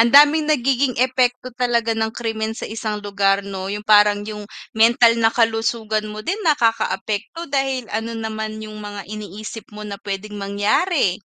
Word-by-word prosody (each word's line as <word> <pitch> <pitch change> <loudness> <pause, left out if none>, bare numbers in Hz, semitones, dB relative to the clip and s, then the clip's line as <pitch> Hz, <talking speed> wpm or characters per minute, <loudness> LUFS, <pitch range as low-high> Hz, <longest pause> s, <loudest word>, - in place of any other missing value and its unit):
Ang 235 +1 +5
daming 295 +3 +7
nagiging 265 -2 +1
epekto 255 -1 +1
talaga 235 -2 +1
ng 220 0 0
krimen 220 -1 -3
sa - - -6
isang 215 -1 -4
lugar 200 -1 +1
'no? 190 -1 -5
'Yung 210 +1 -5
parang 210 -1 +5
'yung 210 -1 -6 0.3
mental 230 +1 +5
na 225 - +5
kalusugan 225 -1 0
mo 210 - -7
din 385 +4 -1
nakaka-apekto 240 - 0
dahil 270 -3 -1
ano 225 +1 -2
naman 220 -1 -4
'yung 215 0 -8
mga 205 -1 -7
iniisip 215 +1 -8
mo 210 0 -8
na 205 - -5
puwedeng 205 +1 -5
mangyari. 205 - +1
220 Hz, 160 wpm, -21 LUFS, 210-245 Hz, 0.3 s, daming